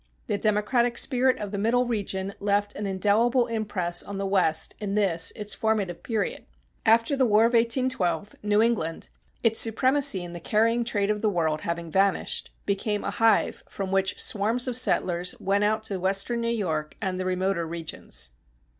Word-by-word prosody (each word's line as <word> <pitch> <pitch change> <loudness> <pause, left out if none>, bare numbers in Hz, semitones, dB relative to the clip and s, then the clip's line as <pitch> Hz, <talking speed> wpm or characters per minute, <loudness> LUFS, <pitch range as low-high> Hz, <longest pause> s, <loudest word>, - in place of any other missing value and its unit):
The 205 - -2
democratic 235 +4 +1
spirit 260 -1 +3
of 205 -2 -6
the 200 - -3
Middle 240 +4 +2
region 200 -4 -3
left 205 0 0
an 205 0 -4
indelible 215 +6 +2
impress 205 -7 -2
on 200 - -7
the 195 - -2
West 180 -5 +1
in 205 -2 -3
this 180 -6 +3
its 210 -1 -2
formative 210 -6 -1
period. 220 -4 -3 0.4
After 230 +5 +4
the 270 - +2
War 215 0 +4
of 235 - +1
1812, 230 - +1
New 210 +1 +2
England, 205 -9 -1 0.3
its 225 -1 +3
supremacy 260 -2 +3
in 175 0 -8
the 175 - -6
carrying 230 +6 +1
trade 205 -3 0
of 210 -1 -3
the 220 - +2
world 160 -5 -1
having 170 -1 -4
vanished, 195 +3 0 0.2
became 205 +1 -1
a - - -2
hive 225 +2 +2
from 195 -1 -5
which 195 -1 0
swarms 230 +2 +1
of 250 - 0
settlers 180 -7 +2
went 200 +1 +1
out 215 +1 +1
to 200 -4 -3
western 195 +6 0
New 230 - -2
York 160 -10 -2
and 190 -3 -3
the 185 - -3
remoter 185 -2 -1
regions. 160 - -5
205 Hz, 175 wpm, -26 LUFS, 190-230 Hz, 0.4 s, After